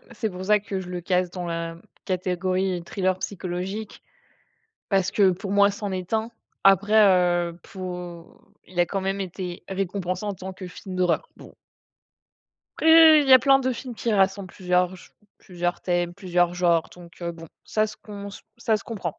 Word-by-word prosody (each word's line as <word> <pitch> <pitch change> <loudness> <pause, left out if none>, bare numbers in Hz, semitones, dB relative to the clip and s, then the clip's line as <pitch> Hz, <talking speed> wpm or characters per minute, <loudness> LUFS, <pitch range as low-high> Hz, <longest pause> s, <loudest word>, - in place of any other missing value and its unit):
c'est 220 -1 -3
pour 185 +1 -7
ça 210 +1 +4
que 195 -2 -4
je 180 - -8
le 180 -1 -4
case 180 0 0
dans 180 -1 -5
la 165 0 -4 0.3
catégorie 185 0 -1
thriller 185 0 -1
psychologique. 190 +3 -5 0.9
Parce 195 -2 +2
que 195 -3 +4
pour 195 +2 -5
moi, 200 0 +5
c'en 205 -1 -5
est 185 +2 -5
un. 220 +1 0 0.3
Après 195 +2 +4
heu, 175 -3 +3
pour 180 -3 -8 0.2
il 180 0 -6
a 175 - +5
quand 195 +2 -3
même 195 +1 -2
été 180 -1 -6
récompensé 190 0 -3
en 205 - -2
tant 190 +1 -8
que 185 -1 -8
film 185 +1 -9
d'horreur, 185 - +1
bon. - - -14 1.2
Après, 320 -1 +8
il 280 - -1
y 265 - +7
a - - +10
plein 270 +1 +5
de 260 -1 0
films 250 0 -6
qui 230 0 -2
rassemblent 195 0 +2
plusieurs 180 0 0
j - - -16 0.3
plusieurs 175 -1 -3
thèmes, 175 -1 -1
plusieurs 175 -2 0
genres, 170 -2 +2
donc 170 -1 -15
heu, 170 0 -3
bon, 165 0 -11 0.2
ça 215 0 +1
se 215 - -10
com 200 -1 -8 0.3
ça 225 -2 +1
se - - -12
comprend. 185 -8 -5
185 Hz, 180 wpm, -24 LUFS, 175-205 Hz, 1.2 s, a